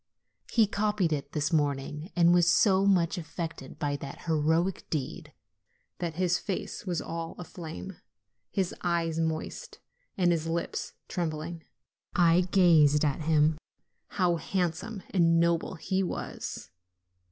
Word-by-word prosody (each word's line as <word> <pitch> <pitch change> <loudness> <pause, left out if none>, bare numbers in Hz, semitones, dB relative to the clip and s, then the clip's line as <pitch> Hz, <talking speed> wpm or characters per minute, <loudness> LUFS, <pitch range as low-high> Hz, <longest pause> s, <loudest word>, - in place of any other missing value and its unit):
He 225 -3 +5
copied 205 -4 0
it 140 -1 -4
this 155 +2 -1
morning, 150 +2 -1
and 170 -1 +5
was 175 -1 +5
so 195 +1 +4
much 180 -2 +3
affected 160 -4 -6
by 145 -1 -1
that 140 -1 -8
heroic 160 +3 +1
deed, 145 -5 -4 0.7
that 170 -3 -3
his 180 0 +1
face 195 0 -4
was 175 -2 -1
all 165 0 -5
aflame, 160 - -8 0.5
his 190 -3 -1
eyes 165 -2 0
moist, 160 -1 -3 0.4
and 180 -2 +3
his 165 -1 0
lips 170 +1 -3
trembling. 165 -1 -4 0.5
I 175 +1 +4
gazed 155 -6 +5
at 145 +1 0
him: 155 0 +3 0.5
how 180 -3 +1
handsome 185 +4 -2
and 165 -3 +4
noble 170 +1 +1
he 190 +3 -1
was 175 - -5
170 Hz, 130 wpm, -29 LUFS, 155-180 Hz, 0.7 s, He